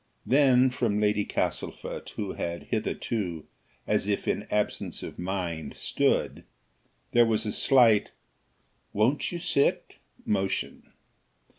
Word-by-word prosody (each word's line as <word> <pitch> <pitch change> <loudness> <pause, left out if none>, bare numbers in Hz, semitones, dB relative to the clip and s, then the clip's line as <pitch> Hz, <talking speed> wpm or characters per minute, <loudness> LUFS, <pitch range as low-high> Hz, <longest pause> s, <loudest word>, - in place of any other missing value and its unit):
Then, 130 -2 +5
from 115 -5 0
Lady 105 0 +2
Castlefort, - - -3
who 100 -3 -3
had 85 0 -4
hitherto, 105 -6 -3 0.4
as - - 0
if 100 -1 -1
in 105 - -1
absence 105 0 -2
of - - -8
mind, 90 -3 -4
stood, - - 0 0.7
there 120 - +6
was 110 -1 +1
a 105 - -1
slight 115 -5 +4 0.8
"Won't 115 +8 +1
you 175 - -3
sit?" 140 -4 0 0.3
motion. 95 -2 -2
105 Hz, 115 wpm, -27 LUFS, 95-120 Hz, 0.8 s, there